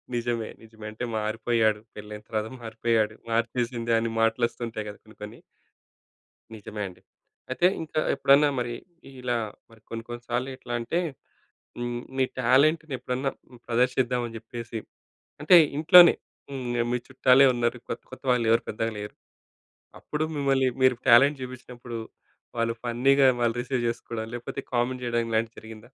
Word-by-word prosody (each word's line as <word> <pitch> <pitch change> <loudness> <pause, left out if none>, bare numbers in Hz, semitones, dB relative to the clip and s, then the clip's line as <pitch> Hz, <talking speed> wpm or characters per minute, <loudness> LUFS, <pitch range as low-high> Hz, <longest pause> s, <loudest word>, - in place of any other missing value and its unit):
నిజమే. 115 -2 -2
నిజమే. 110 -1 -13
అంటే, 110 +3 -7
"మారిపోయాడు, 110 0 +1
పెళ్లయిన 105 0 -9
తర్వాత 110 -1 -1
మారిపోయాడు, 110 -1 0 0.2
మార్చేసింది" 115 0 0
అని 115 0 -2
మాటలొస్తుంటాయి 115 -1 -1
కదా! 105 - -10
కొన్ని 110 -1 -18
కొన్ని. 110 +3 -9 1.2
నిజమే 105 0 -7
అండి. 90 -1 -14 0.5
అయితే 175 +7 +3
ఇంకా 155 -1 -2 0.2
ఎప్పుడన్నా 140 +2 +5
మరి 120 -1 -2 0.5
ఇలా 120 -1 0 0.3
మరి 115 -1 -19
కొన్ని 115 0 -5
కొన్ని 120 0 -7
సార్లెట్లంటే 120 +2 -2 0.8
హ్మ్, 120 0 -3
మీ 130 - +3 0.2
టాలెంట్‌నెప్పుడన్నా 135 0 +2 0.4
ప్రదర్శిద్దాం 125 +1 +1
అని 115 - -9
జెప్పేసి 115 0 -7 0.6
అంటే 155 +4 +7 0.2
ఇంట్లోనే 170 +2 +8 0.4
హ్మ్. 125 -3 -3
మీ 125 - +1
చుట్టాలే 130 +1 +5
ఉన్నారు. 120 0 0
కొత్త - - -5
కొత్త 130 - -10
వాళ్ళెవరు 115 -1 +3
పెద్దగా 115 +2 -2
లేరు. 105 0 -7 0.8
అప్పుడు 150 +1 -3
మిమ్మల్ని 135 -2 +2
మీరు 130 -1 +5
టాలెంట్ 135 +4 +7
జూపిచ్చినప్పుడు 125 -2 -8 0.6
వాళ్ళు 115 0 +1
ఫన్నీగా 135 +3 +4
వాళ్ళు 120 -1 +2
రిసీవ్ 125 -1 -2
జేసుకోడం 115 -1 -4
లేకపోతే 120 0 -5
కామెంట్ 125 +1 0
జేయడం 120 -1 0
ఇలాంటివి 115 +1 -1
జరిగిందా? 110 -1 -11
120 Hz, 130 wpm, -26 LUFS, 115-130 Hz, 1.2 s, ఇంట్లోనే